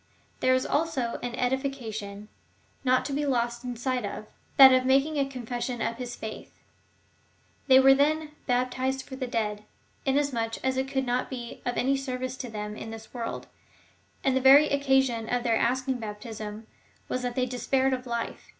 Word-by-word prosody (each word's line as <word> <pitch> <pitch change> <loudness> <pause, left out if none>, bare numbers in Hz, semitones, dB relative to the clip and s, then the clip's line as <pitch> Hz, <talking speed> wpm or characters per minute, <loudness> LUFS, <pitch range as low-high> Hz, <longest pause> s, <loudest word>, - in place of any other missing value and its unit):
There 255 0 +4
is 255 - 0
also 285 -7 -1
an 245 -1 -4
edification, 240 -6 -3 0.6
not 255 -1 +3
to 280 - -3
be 290 +2 0
lost 240 -3 0 0.2
sight 255 0 -1
of 205 +1 -5 0.2
— - - -35
that 265 -1 +10
of 255 0 +4
making 275 +4 +2
a 275 -1 +1
confession 245 -1 -4
of 230 0 -2
his 245 -1 -5
faith. 220 0 -8 1.1
They 260 -1 +8
were, 270 0 +7
then, 300 +2 +1 0.2
hai^tized 255 +2 0
for 265 - -9
the 260 -1 -4
dead, 210 -3 -2 0.4
inasmuch 265 -5 0
as 260 0 +1
it 265 +1 -1
could 265 -1 -1
not 245 +1 -1
be 240 -3 -7
of 245 - -1
any 270 +2 +2
service 255 -1 -3
to 250 - -6
them 210 -1 -5
in 220 - -7
this 225 0 -10
world, 235 -2 -4 0.8
and 265 -1 +2
the 260 - +2
very 280 +3 +7
occasion 265 -5 +2
of 245 -1 0
their 230 -2 +2
asking 255 +2 0
baptism 215 0 -7 0.4
was 255 - -2
that 245 -1 -3
they 255 - +1
despaired 260 +1 +1
of 255 0 -4
life. 235 -1 -4
255 Hz, 175 wpm, -27 LUFS, 235-265 Hz, 1.1 s, that